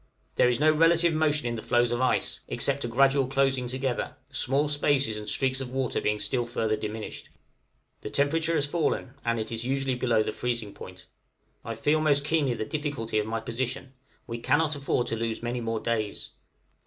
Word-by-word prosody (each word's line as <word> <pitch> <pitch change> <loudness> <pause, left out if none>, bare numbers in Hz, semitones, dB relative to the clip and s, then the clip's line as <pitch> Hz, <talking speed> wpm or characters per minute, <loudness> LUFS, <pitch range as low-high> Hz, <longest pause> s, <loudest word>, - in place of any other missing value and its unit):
There 125 - +4
is 120 0 0
no 155 +1 +5
relative 165 +2 +4
motion 150 -4 +2
in 120 - -2
the 110 - -5
floes 120 +1 +2
of 120 +1 0
ice, 130 - +1
except 140 0 0
a - - -1
gradual 135 +2 +3
closing 135 -1 +1
together, 130 0 -2
the - - -28
small 140 +3 +1
spaces 145 -5 +2
and 105 0 -4
streaks 135 0 0
of 125 -2 -5
water 130 -2 -1
being 105 0 0
still 125 +2 0
further 115 -2 -1
diminished. 110 0 -6 0.7
The - - -5
temperature 160 +4 +1
has 145 - +2
fallen, 145 -4 -1
and 115 0 0
is 115 0 -2
usually 135 +1 0
below 120 -3 +2
the - - -2
freezing 120 -4 -3
point. 95 0 -11 0.6
I - - -4
feel 155 +1 +2
most 145 -2 +3
keenly 150 -5 +1
the 110 - -3
difficulty 140 -6 -2
of 105 - -2
my 115 0 -2
position; 125 +3 -4 0.3
we 115 -1 -5
cannot 155 +5 +2
afford 135 -3 0
to - - -2
lose 115 0 -3
many 120 +1 -2
more 115 -1 -2
days. 110 -3 -2
130 Hz, 190 wpm, -27 LUFS, 115-145 Hz, 0.7 s, no